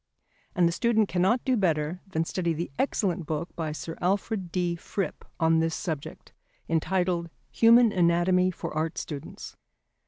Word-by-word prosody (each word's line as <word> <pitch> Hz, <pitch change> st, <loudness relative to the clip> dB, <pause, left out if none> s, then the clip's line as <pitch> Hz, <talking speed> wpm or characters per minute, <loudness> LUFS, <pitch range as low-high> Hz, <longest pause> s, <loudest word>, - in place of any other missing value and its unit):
And 175 Hz, -1 st, +4 dB
the -, -, +1 dB
student 220 Hz, +2 st, +2 dB
cannot 190 Hz, +7 st, +1 dB
do 260 Hz, -, +3 dB
better 170 Hz, -4 st, 0 dB
than 165 Hz, -4 st, -1 dB
study 170 Hz, -1 st, -1 dB
the 165 Hz, 0 st, -4 dB
excellent 185 Hz, -, 0 dB
book 160 Hz, +2 st, -4 dB
by 160 Hz, -3 st, -3 dB
Sir 165 Hz, +2 st, -7 dB
Alfred 190 Hz, 0 st, -1 dB
D. 175 Hz, -1 st, 0 dB
Fripp 175 Hz, 0 st, -4 dB, 0.2 s
on 160 Hz, -1 st, +3 dB
this 160 Hz, 0 st, 0 dB
subject, 155 Hz, -5 st, -6 dB, 0.3 s
entitled 175 Hz, +1 st, 0 dB, 0.2 s
Human 230 Hz, 0 st, +6 dB
Anatomy 180 Hz, 0 st, +3 dB
for 180 Hz, -, -6 dB
Art 160 Hz, +1 st, -2 dB
Students. 145 Hz, -3 st, -7 dB
175 Hz, 150 wpm, -27 LUFS, 165-190 Hz, 0.3 s, Human